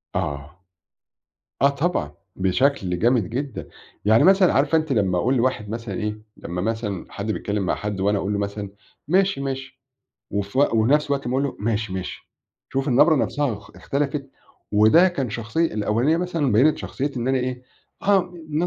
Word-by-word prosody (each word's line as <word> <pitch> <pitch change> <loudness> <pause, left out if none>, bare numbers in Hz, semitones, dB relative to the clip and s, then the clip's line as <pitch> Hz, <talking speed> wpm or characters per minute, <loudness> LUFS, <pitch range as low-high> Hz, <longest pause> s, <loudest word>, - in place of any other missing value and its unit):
آه. 75 +4 -4 1.0
آه 140 - +7
طبعًا، 140 - -1 0.2
بشَكل 95 -1 +1
جامد 115 -4 +2
جدًا. 135 0 -4 0.4
يعني 110 +2 +5
مثلًا 190 -1 +5
عارفة 145 +4 +3
أنتِ 155 -3 -2
لمّا 95 -6 +1
أقول 125 +9 +1
لواحد 120 -4 0
مثلًا 115 -3 -5
إيه، 105 +2 -3 0.2
لمّا 90 +1 -5
مثلًا 110 -4 -3
حد 100 +2 -4
بيتكلم 100 -2 -2
مع - - +1
حد 105 -2 -4
وأنا 100 +2 +2
أقول 100 +1 -2
له 100 - -1
مثلًا: 100 0 -4 0.4
"ماشي، 190 -1 +2
ماشي." 135 0 -5 0.5
وف 100 +3 -3
ونَفس 140 +2 +3
الوقت 140 -2 -2
أمّا 125 - -1
أقول 140 - +1
له: 140 - -3
"ماشي، 110 -2 -1
ماشي." 95 -1 -6 0.4
شوف 135 +1 -1
النَبرة 150 +5 +5
نَفسَها 135 -1 0
أخ 105 0 -10
اختلفت، 140 -1 -2 0.4
وده 110 - +6
كان 135 - -3
شخصية 115 +8 -1
الأولانية 115 +9 +1
مثلًا 170 -7 0
بيّنِت 135 +8 +4
شخصية 140 +2 -3
إن 120 +2 -1
أنا 135 0 +2
إيه، 125 0 -3 0.4
ها 200 0 +4 0.3
م 155 +3 0
120 Hz, 165 wpm, -23 LUFS, 105-140 Hz, 1.0 s, آه